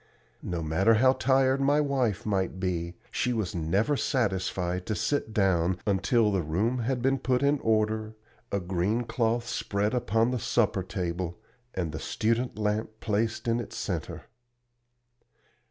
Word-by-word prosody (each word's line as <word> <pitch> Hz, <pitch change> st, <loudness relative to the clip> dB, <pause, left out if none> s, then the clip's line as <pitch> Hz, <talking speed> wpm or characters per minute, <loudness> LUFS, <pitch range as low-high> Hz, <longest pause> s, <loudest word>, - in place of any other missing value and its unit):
No 85 Hz, -2 st, -3 dB
matter 95 Hz, +9 st, +3 dB
how 130 Hz, +4 st, +5 dB
tired 135 Hz, 0 st, +2 dB
my 145 Hz, +2 st, +3 dB
wife 135 Hz, -8 st, 0 dB
might 95 Hz, -3 st, -1 dB
be, 85 Hz, -2 st, -2 dB, 0.2 s
she 125 Hz, -, 0 dB
was 110 Hz, -6 st, -2 dB
never 95 Hz, -, +1 dB
satisfied 95 Hz, -, -1 dB
to 110 Hz, -, -1 dB
sit 140 Hz, 0 st, -1 dB
down 95 Hz, -4 st, +2 dB
until 105 Hz, +2 st, +2 dB
the 95 Hz, -2 st, +1 dB
room 100 Hz, +11 st, 0 dB
had 125 Hz, +1 st, -1 dB
been 135 Hz, +1 st, +2 dB
put 125 Hz, +1 st, +1 dB
in 140 Hz, +1 st, +3 dB
order, 110 Hz, -1 st, 0 dB, 0.4 s
a 100 Hz, -, +1 dB
green 95 Hz, +6 st, 0 dB
cloth 115 Hz, +1 st, 0 dB
spread 105 Hz, -3 st, -1 dB
upon 115 Hz, -1 st, +1 dB
the 125 Hz, -, -1 dB
supper 105 Hz, -4 st, +1 dB
table 90 Hz, -1 st, -3 dB, 0.4 s
and 85 Hz, -4 st, -2 dB
the 75 Hz, -, -5 dB
student 115 Hz, -, -1 dB
lamp 105 Hz, +1 st, 0 dB
placed 110 Hz, +2 st, -1 dB
in 115 Hz, +1 st, +2 dB
its 120 Hz, -, -6 dB
centre. -, -, -4 dB
110 Hz, 150 wpm, -28 LUFS, 95-120 Hz, 0.4 s, how